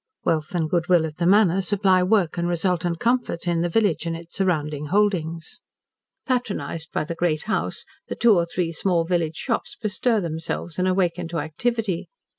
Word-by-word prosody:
Wealth 160 +3 0
and 165 -3 +1
good 170 +1 0
will 175 -3 +5
at 155 -1 -7
the 175 - +1
Manor 195 -1 +5
supply 190 -1 +3
work 185 -3 +2
and 170 0 -1
resultant 175 -1 0
comfort 235 -8 0
in 170 -1 +1
the 175 - 0
village 195 -3 +1
and 165 0 -2
its 170 0 -13
surrounding 150 -6 -1
holdings. 170 -4 0 0.7
Patronised 210 - -2
by - - -1
the 165 +2 -4
Great 165 -2 0
House 220 - -2 0.2
the - - -4
two 235 -2 +5
or 170 -3 +2
three 170 -1 -1
small 170 0 +1
village 165 -2 0
shops 275 - -3
bestir 220 +2 +1
themselves 165 -1 -4
and 185 - +2
awaken 180 -2 +1
to 165 0 -4
activity. 190 +5 -2
175 Hz, 180 wpm, -23 LUFS, 165-195 Hz, 0.7 s, will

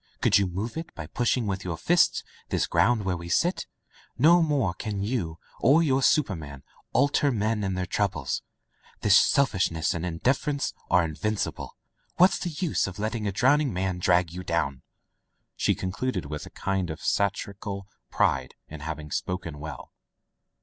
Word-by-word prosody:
Could - - +4
you 100 - +1
move 100 - -4
it 165 - -5
by 85 - -6
pushing 120 +7 0
with 95 -2 -2
your 85 -3 -3
fists 175 - +3 0.3
this - - +1
ground 105 +5 +2
where 95 -2 0
we 85 0 -7
sit? 175 - +1 0.5
No 170 +6 +6
more 145 - +1
can 100 +2 -4
you 100 -8 -2 0.2
or 145 +7 +5
your 135 -3 +2
superman 80 - +1 0.3
alter 145 +1 +3
men 110 -2 0
and 95 -1 -1
their 90 - -1
troubles. 90 -8 -1 0.6
Their 105 - +2
selfish 105 0 +4
ness 80 -1 -1
and 85 - -4
indifference 130 - 0 0.2
are 90 -1 +4
invincible. 100 +7 -3 0.4
What's 180 +2 +5
the 175 - -2
use 165 - 0
of 95 - -7
letting 110 0 -2
a - - 0
drowning 130 +7 +3
man 90 -1 -2
drag 85 -1 +3
you 90 +1 -6
down 85 -6 -1 0.4
?'* - - -50
she - - +1
concluded 95 - -3
with 75 0 -6
a - - -10
kind 95 -2 -2
of 80 - -5
satir 100 0 0
ical 100 0 -6 0.3
pride - - +1
in 80 - -8
having 75 -1 -6
spoken 85 -5 -3
well. 75 -3 -8
100 Hz, 170 wpm, -26 LUFS, 85-125 Hz, 0.6 s, No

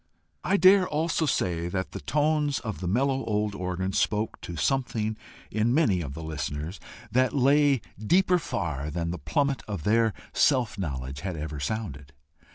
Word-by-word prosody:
I 200 - +2
dare 190 -1 +6
also 160 +1 0
say 85 -9 0
that 95 +1 -3
the - - -6
tones 150 -1 +1
of 110 -8 -5
the 90 - -3
mellow 135 +7 +1
old 105 -1 -1
organ 95 0 -3
spoke 105 +1 0
to 85 - -6
something 110 - 0 0.4
in 110 +4 +1
many 110 - +3
of 70 -3 -6
the 80 - -6
listeners 75 +2 -4 0.3
that 130 +4 +2
lay 140 -1 +4 0.2
deeper 180 - +4
far 85 - -3
than 85 +1 -2
the 90 - -5
plummet 140 - 0
of 100 -7 -4
their 110 +2 +3 0.2
self 125 -7 +2
knowledge 70 -5 -4
had 95 -3 -4
ever 75 -1 -5
sounded. 70 -5 -4
105 Hz, 165 wpm, -27 LUFS, 85-135 Hz, 0.4 s, dare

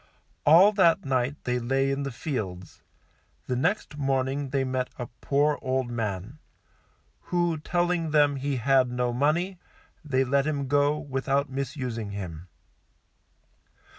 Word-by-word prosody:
All 175 +7 +8
that 170 -8 +3
night 130 +1 0
they 125 0 0
lay 135 +3 +1
in 135 +1 -2
the 140 -1 -3
fields; 105 - -5 0.6
the 125 - -2
next 160 - -1
morning 135 0 0
they 135 0 0
met 130 -1 -2
a 125 - -4
poor 145 +5 0
old 130 -2 -1
man, 110 +3 -4 0.9
who 175 -3 0
telling 175 0 0
them 145 -2 +3
he 140 +1 -2
had 130 +1 +3
no 125 0 -1
money, 165 +8 0 0.4
they 135 -3 +1
let 140 +2 +1
him 140 -3 -1
go 145 +2 +2
without 140 -1 -1
misusing 130 -5 -4
him. 90 -4 -7
135 Hz, 135 wpm, -27 LUFS, 125-150 Hz, 0.9 s, All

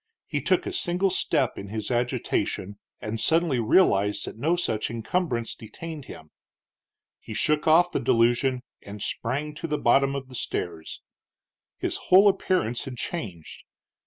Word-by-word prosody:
He - - -2
took - - +1
a 375 - -4
single 190 - +1
step 135 -8 0
in 100 - -7
his 110 +3 -4
agitation, 120 -4 -1 0.2
and 110 +1 -4
suddenly 160 -4 +2
realized 105 - +3
that - - -7
no 155 +10 +1
such 110 -11 -1
encumbrance 120 +1 -2
detained 155 +6 -8
him. 80 -9 -11 0.9
He - - -8
shook 150 +1 +1
off 175 +3 +5
the - - 0
delusion 120 +2 +2 0.2
and 100 +1 -9
sprang 140 +9 -2
to 150 +2 -5
the 150 -1 -1
bottom 135 +2 +3
of 135 -1 -5
the 130 - -14
stairs. 85 -8 -4 0.7
His - - -2
whole 195 +3 +7
appearance 185 - +1
had 130 -2 -7
changed. 100 - -6
130 Hz, 150 wpm, -26 LUFS, 110-165 Hz, 0.9 s, whole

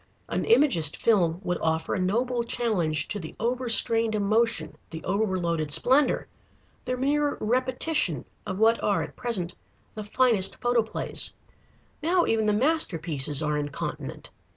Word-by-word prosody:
An - - -2
Imagist 225 - +4
film 175 -7 +2
would 180 -1 -2
offer 160 0 -1
a - - -1
noble 235 +7 0
challenge 185 -11 -1
to 210 - -3
the 160 -4 -9
overstrained 230 -2 +2
emotion, 220 +3 0
the 160 -1 -8
over 200 0 -1
loaded 170 -3 -2
splendor, 260 - +2 0.6
the 255 - -2
mere 285 +2 0
repetition 255 - -1 0.2
of 185 - -4
what 225 +2 +3
are 200 - +1
at - - -10
present 190 -8 -3 0.4
the 215 - -6
finest 215 -2 +2
photoplays. 240 -2 0 0.7
Now 345 +3 +2
even 220 -1 0
the - - +3
masterpieces 165 - +2
are 150 0 0
incontinent. 145 -1 -6
215 Hz, 135 wpm, -26 LUFS, 170-245 Hz, 0.7 s, Imagist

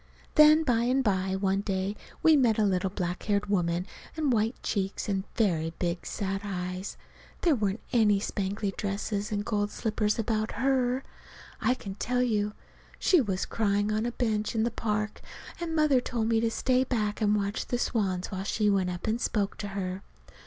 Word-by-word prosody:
Then 305 +1 +7
by 235 -5 +2
and 260 +2 +2
by, 190 -3 +1
one 195 0 +1
day, 195 0 -2 0.3
we 320 -1 +7
met 240 -6 +3
a 215 - +3
little 190 -1 +1
black 180 -2 -3
haired 205 -1 0
woman 175 -3 0 0.3
with 315 -1 -2
white 225 +2 +1
cheeks 195 -1 -2
and 195 -1 -1
very 165 -7 +1
big 175 0 -2
sad 195 -1 -2
eyes. 185 -1 -4 0.4
There 335 - +4
weren't 210 -4 -1
any 210 -4 +4
spangly 200 0 -2
dresses 205 +1 -2
and 205 0 -1
gold 205 -3 0
slippers 210 0 -1
about 220 -1 -1
her, 260 +1 +1 0.6
I 255 - +3
can 200 -6 -7
tell 250 +5 0
you! 210 -3 0 0.4
She 360 -5 +4
was 190 -6 -1
crying 205 -1 0
on 215 +2 0
a - - -2
bench 220 -3 -1
in 220 - +2
the 235 - 0
park, 215 -1 -2 0.4
and 335 -2 -3
Mother 300 -5 +4
told 230 -3 -1
me 225 -1 +3
to 230 0 +1
stay 255 +2 +2
back 220 -5 -1
and 210 -1 +3
watch 200 +1 -2
the 245 - 0
swans 195 -7 -1
while 190 -1 -3
she 210 +1 +1
went 190 -2 +1
up 180 -1 -5
and 225 +2 0
spoke 205 -2 0
to 205 - -4
her. 190 -1 -4
210 Hz, 185 wpm, -28 LUFS, 195-235 Hz, 0.6 s, Then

